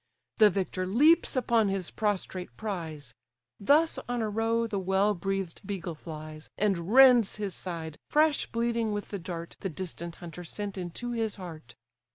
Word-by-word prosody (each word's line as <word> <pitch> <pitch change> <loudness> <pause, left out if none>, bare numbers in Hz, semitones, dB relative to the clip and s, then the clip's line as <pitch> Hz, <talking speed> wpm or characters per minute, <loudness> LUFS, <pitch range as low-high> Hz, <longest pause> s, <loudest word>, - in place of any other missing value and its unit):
The 215 -1 +8
victor 185 -1 -2
leaps 295 - +4
upon 235 -4 +3
his 195 -3 -2
prostrate 190 -3 -2
prize: 160 - -5 0.5
Thus 300 +10 +3
on 245 -2 0
a 215 - -1
roe 225 +2 +1
the 215 -3 -2
well 190 +2 +2
breath'd 195 -1 -3
beagle 190 -4 -4
flies, 155 0 -9
And 195 -3 0
rends 250 -5 +7
his 205 -3 -3
side, 165 -4 -5
fresh 305 0 +3
bleeding 230 -2 0
with 205 0 -4
the 200 - -4
dart 170 -1 -7
The 190 - -3
distant 170 0 -6
hunter 175 0 -9
sent 200 +4 -4
into 185 +6 -5
his 225 -3 -1
heart. 160 - -10
195 Hz, 160 wpm, -29 LUFS, 170-225 Hz, 0.5 s, The